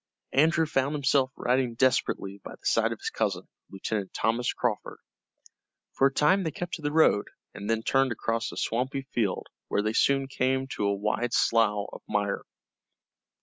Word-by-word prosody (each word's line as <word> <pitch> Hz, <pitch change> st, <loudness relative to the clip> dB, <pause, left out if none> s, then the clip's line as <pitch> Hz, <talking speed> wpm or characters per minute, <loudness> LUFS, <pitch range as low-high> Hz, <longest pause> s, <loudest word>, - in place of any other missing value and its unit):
Andrew 160 Hz, +3 st, +4 dB
found 140 Hz, -1 st, 0 dB
himself 135 Hz, -2 st, +2 dB
riding 125 Hz, -1 st, 0 dB
desperately 115 Hz, -6 st, +1 dB
by -, -, -8 dB
the -, -, -24 dB
side -, -, +2 dB
of -, -, -4 dB
his -, -, -4 dB
cousin, -, -, -2 dB, 0.2 s
Lieutenant 100 Hz, 0 st, -4 dB
Thomas 120 Hz, +3 st, +1 dB
Crawford. 120 Hz, -4 st, -2 dB, 1.0 s
For 135 Hz, -, +4 dB
a -, -, -2 dB
time 165 Hz, +8 st, +3 dB
they 165 Hz, -, -1 dB
kept 175 Hz, +3 st, -6 dB
to 160 Hz, -, -4 dB
the 145 Hz, 0 st, -1 dB
road, 150 Hz, -10 st, +4 dB, 0.3 s
and 100 Hz, +1 st, -6 dB
then 115 Hz, 0 st, +1 dB
turned 135 Hz, +1 st, +2 dB
across 115 Hz, +1 st, -2 dB
a -, -, -10 dB
swampy 130 Hz, +4 st, -1 dB
field, 105 Hz, -6 st, -1 dB, 0.2 s
where 105 Hz, -, 0 dB
they 110 Hz, +1 st, 0 dB
soon 135 Hz, +3 st, +2 dB
came 130 Hz, 0 st, 0 dB
to 105 Hz, -, -2 dB
a 100 Hz, -, +1 dB
wide 105 Hz, +4 st, -1 dB
slough 105 Hz, -3 st, +3 dB
of -, -, -9 dB
mire. 100 Hz, -1 st, 0 dB
125 Hz, 175 wpm, -27 LUFS, 110-135 Hz, 1.0 s, Andrew